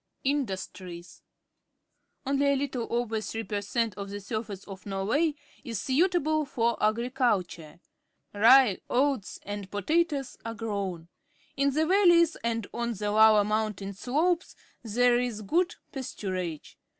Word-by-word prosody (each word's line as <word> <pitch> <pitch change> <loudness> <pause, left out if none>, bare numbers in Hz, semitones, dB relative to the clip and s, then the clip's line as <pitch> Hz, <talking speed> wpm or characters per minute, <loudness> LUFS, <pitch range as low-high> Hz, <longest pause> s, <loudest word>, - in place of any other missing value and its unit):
Industries. 190 -9 -4 0.5
— - - -49
Only 280 +1 +1
a - - +3
little 270 -4 -2
over 230 -2 -1
th 220 - -6
ree 225 - -2
per_ 205 -2 -3
centof 205 -2 -2
the 205 +1 -5
surface 205 -1 -5
of 195 0 -10
Norway 225 +12 0 0.3
is 230 -4 -4
suitable 310 - +2
for 235 -5 0
agriculture. 215 - 0 0.5
Rye, 230 0 +6
oats, 260 -4 0
and 205 -1 -6
potatoes 280 - 0
are 230 0 -5
grown. 200 -7 -4 0.5
In 280 0 +2
the 310 +3 +1
valleys 345 -3 +5
and 230 -2 -1
on 235 0 -2
the 205 +1 -2
lower 215 0 +6
mountain 210 -2 -2
slopes 315 - 0 0.3
there 240 +2 +3
is 235 -4 -3
good 345 - +1 0.2
pasturage. 185 - -5
230 Hz, 130 wpm, -28 LUFS, 205-275 Hz, 0.5 s, Rye